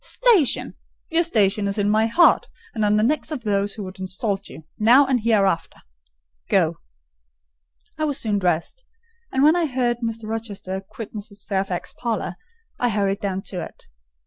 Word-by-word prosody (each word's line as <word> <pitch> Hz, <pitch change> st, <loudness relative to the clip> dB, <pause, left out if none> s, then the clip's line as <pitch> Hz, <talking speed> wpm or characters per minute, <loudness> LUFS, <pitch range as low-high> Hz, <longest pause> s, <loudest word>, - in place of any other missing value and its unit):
station!—your 340 Hz, -, +1 dB
station 210 Hz, -, +1 dB
is 200 Hz, -, -2 dB
in 205 Hz, -1 st, +1 dB
my 215 Hz, +2 st, +3 dB
heart, 340 Hz, +10 st, +4 dB, 0.3 s
and 220 Hz, -, -1 dB
on 210 Hz, 0 st, +3 dB
the 210 Hz, -, +3 dB
necks 300 Hz, +6 st, 0 dB
of 295 Hz, -7 st, -5 dB
those 200 Hz, -1 st, 0 dB
who 210 Hz, -, -6 dB
would 185 Hz, 0 st, -9 dB
insult 195 Hz, +2 st, -3 dB
you, 160 Hz, -, -11 dB, 0.2 s
now 245 Hz, +6 st, +6 dB
or 265 Hz, -1 st, +1 dB
hereafter.—Go." -, -, -1 dB, 1.2 s
I 310 Hz, -, +1 dB
was 290 Hz, -2 st, -1 dB
soon 210 Hz, -6 st, 0 dB
dressed; 180 Hz, -, -1 dB, 0.5 s
and 265 Hz, -, +2 dB
when 310 Hz, +3 st, +6 dB
I 345 Hz, -2 st, +1 dB
heard 245 Hz, -3 st, 0 dB
Mr. 225 Hz, -2 st, -4 dB
Rochester 205 Hz, -4 st, -4 dB
quit 205 Hz, +2 st, -9 dB
Mrs. 205 Hz, -1 st, -8 dB
Fairfax's 190 Hz, -3 st, -2 dB
parlour, 225 Hz, -6 st, -3 dB, 0.4 s
I 245 Hz, -, +2 dB
hurried 200 Hz, -2 st, 0 dB
down 195 Hz, -2 st, -3 dB
to 185 Hz, -3 st, -5 dB
it. -, -, -11 dB
210 Hz, 160 wpm, -22 LUFS, 195-240 Hz, 1.2 s, now